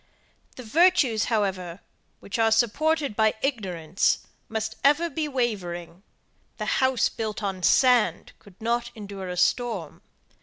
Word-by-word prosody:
The 255 Hz, -, -9 dB
virtues, 275 Hz, -, +3 dB
however, 190 Hz, -5 st, -1 dB, 0.4 s
which 200 Hz, -, -5 dB
are 225 Hz, 0 st, +3 dB
supported 280 Hz, +4 st, +1 dB
by 220 Hz, 0 st, +2 dB
ignorance, 185 Hz, -, 0 dB, 0.2 s
must 220 Hz, 0 st, -3 dB
ever 305 Hz, +4 st, +3 dB
be 310 Hz, +1 st, -2 dB
wavering 190 Hz, -, -3 dB, 0.6 s
the -, -, -4 dB, 0.2 s
house 260 Hz, -2 st, +3 dB
built 215 Hz, -1 st, -5 dB
on 190 Hz, -2 st, -3 dB
sand 240 Hz, -4 st, +3 dB
could 200 Hz, -1 st, -19 dB
not 235 Hz, +1 st, -1 dB
endure 200 Hz, -3 st, -7 dB
a 180 Hz, -, -5 dB
storm. 220 Hz, -7 st, 0 dB
220 Hz, 125 wpm, -25 LUFS, 195-255 Hz, 0.6 s, virtues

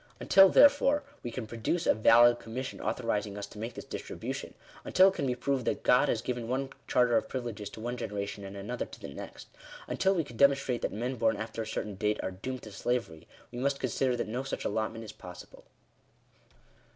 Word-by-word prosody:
Until 195 Hz, 0 st, +7 dB
therefore, 285 Hz, +2 st, +5 dB, 0.2 s
we 120 Hz, -, -4 dB
can 120 Hz, 0 st, -5 dB
produce 115 Hz, +10 st, -2 dB
a -, -, +5 dB
valid 120 Hz, +2 st, +6 dB
commission 130 Hz, +4 st, -6 dB
authoriz 110 Hz, -4 st, -1 dB
ing 100 Hz, 0 st, -8 dB
us 100 Hz, -, -4 dB
to 105 Hz, -, -12 dB
make 115 Hz, +2 st, -5 dB
this -, -, -8 dB
distribution -, -, -6 dB
— -, -, -20 dB
until 190 Hz, +1 st, +5 dB
it -, -, -5 dB
can 140 Hz, -7 st, -2 dB
be 125 Hz, -, 0 dB
proved 135 Hz, +1 st, -1 dB
that -, -, -1 dB
God 125 Hz, -, +4 dB
has 110 Hz, -, 0 dB
given 120 Hz, -2 st, -3 dB
one 135 Hz, +2 st, -2 dB, 0.2 s
charter 125 Hz, -2 st, +3 dB
of -, -, -1 dB
privileges 120 Hz, -6 st, -5 dB
to -, -, -11 dB
one 120 Hz, +2 st, -4 dB
generation, 100 Hz, -3 st, -4 dB
and 100 Hz, 0 st, -8 dB
another 115 Hz, +5 st, -4 dB
to -, -, -12 dB
the -, -, -8 dB
next 70 Hz, -, -9 dB, 0.2 s
— -, -, -14 dB
until 195 Hz, +1 st, +1 dB
we 165 Hz, -, +1 dB
can 120 Hz, -5 st, -12 dB
demonstrate 135 Hz, -2 st, +3 dB
that -, -, -1 dB
men 125 Hz, +4 st, -3 dB
born 110 Hz, -1 st, +2 dB
after 110 Hz, +1 st, -5 dB
a 110 Hz, -, -5 dB
certain 105 Hz, -, -4 dB
date 105 Hz, +2 st, -1 dB
are -, -, -2 dB
doomed 125 Hz, +7 st, -6 dB
to 110 Hz, -, -9 dB
slavery, 115 Hz, -7 st, -3 dB, 0.2 s
we 120 Hz, -, -6 dB
must 140 Hz, +1 st, 0 dB
consider 130 Hz, 0 st, 0 dB
that -, -, -2 dB
no 120 Hz, +4 st, -2 dB
such 135 Hz, -, -5 dB
allotment 110 Hz, +1 st, -2 dB
is 110 Hz, -, -8 dB
permissible. 90 Hz, -3 st, -12 dB
120 Hz, 220 wpm, -30 LUFS, 110-130 Hz, 0.2 s, Until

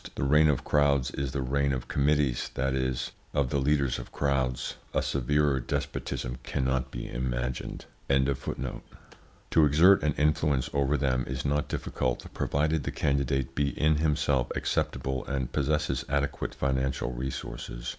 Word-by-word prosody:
The -, -, -2 dB
reign 75 Hz, +3 st, +5 dB
of 70 Hz, -4 st, +1 dB
crowds 70 Hz, -3 st, +2 dB
is 70 Hz, -1 st, -3 dB
the 70 Hz, -1 st, -2 dB
reign 70 Hz, +2 st, +1 dB
of 65 Hz, -2 st, -3 dB
committees, 70 Hz, -3 st, +1 dB
that 65 Hz, +1 st, 0 dB
is, 65 Hz, -1 st, -1 dB, 0.2 s
of 70 Hz, -3 st, +1 dB
the 70 Hz, -, +1 dB
leaders 70 Hz, -2 st, +1 dB
of -, -, -9 dB
crowds. 65 Hz, -3 st, -1 dB, 0.2 s
A -, -, +2 dB
severer 70 Hz, +1 st, +1 dB
despotism 65 Hz, -2 st, -3 dB
cannot 65 Hz, 0 st, -1 dB
be -, -, -6 dB
imagined. -, -, -3 dB, 0.2 s
To 65 Hz, +3 st, -2 dB
exert 85 Hz, +7 st, +6 dB
an 75 Hz, -1 st, +1 dB
influence 75 Hz, -3 st, +1 dB
over 70 Hz, +1 st, +2 dB
them 65 Hz, -3 st, +1 dB
is 65 Hz, +1 st, -4 dB
not 75 Hz, +1 st, +1 dB
difficult, 65 Hz, -1 st, -2 dB
provided 75 Hz, +2 st, 0 dB
the -, -, -3 dB
candidate 70 Hz, -2 st, 0 dB
be 70 Hz, 0 st, -1 dB
in 75 Hz, 0 st, +4 dB
himself 70 Hz, -5 st, +1 dB
acceptable 65 Hz, -1 st, -1 dB
and 65 Hz, -3 st, -2 dB
possess 75 Hz, +2 st, 0 dB
adequate 70 Hz, 0 st, -1 dB
financial 65 Hz, -2 st, -1 dB
resources. 60 Hz, -1 st, -5 dB
70 Hz, 145 wpm, -28 LUFS, 65-75 Hz, 0.2 s, exert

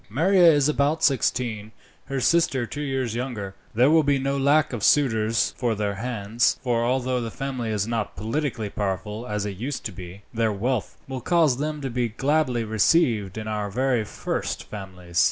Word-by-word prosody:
"Maria 170 Hz, -, +5 dB
is 145 Hz, -2 st, +3 dB
about 150 Hz, +1 st, +1 dB
sixteen, 115 Hz, -5 st, +1 dB, 0.3 s
her 135 Hz, 0 st, -3 dB
sister 135 Hz, -4 st, +2 dB
two 145 Hz, +5 st, -6 dB
years 135 Hz, -5 st, -2 dB
younger. 115 Hz, -6 st, -4 dB, 0.2 s
There 125 Hz, +6 st, +5 dB
will 160 Hz, 0 st, +6 dB
be 145 Hz, -2 st, +2 dB
no 135 Hz, +1 st, -1 dB
lack 145 Hz, +2 st, +3 dB
of 110 Hz, -4 st, -4 dB
suitors 115 Hz, -6 st, +3 dB
for 120 Hz, -3 st, 0 dB
their 105 Hz, -1 st, -1 dB
hands, 115 Hz, +1 st, 0 dB
for 120 Hz, -2 st, +1 dB
although 125 Hz, 0 st, 0 dB
the 115 Hz, -, -3 dB
family 130 Hz, -1 st, -4 dB
is 105 Hz, -2 st, 0 dB
not 115 Hz, -2 st, -3 dB
politically 110 Hz, 0 st, -2 dB
powerful, 105 Hz, +3 st, -3 dB
as 105 Hz, -1 st, -2 dB
it 100 Hz, -2 st, -5 dB
used 130 Hz, +8 st, -4 dB
to 105 Hz, -, -3 dB
be, 90 Hz, +2 st, -10 dB
their 115 Hz, -1 st, +1 dB
wealth 115 Hz, +3 st, -2 dB
would 130 Hz, -2 st, -6 dB
cause 165 Hz, -7 st, +3 dB
them 150 Hz, +1 st, -3 dB
to 135 Hz, -2 st, -3 dB
be 120 Hz, -1 st, 0 dB
gladly 135 Hz, 0 st, +1 dB
received 110 Hz, -, +2 dB
in 110 Hz, 0 st, -5 dB
our 105 Hz, -1 st, -2 dB
very 125 Hz, +1 st, +1 dB
first -, -, -4 dB
families." 90 Hz, -4 st, -5 dB
120 Hz, 180 wpm, -24 LUFS, 105-140 Hz, 0.3 s, will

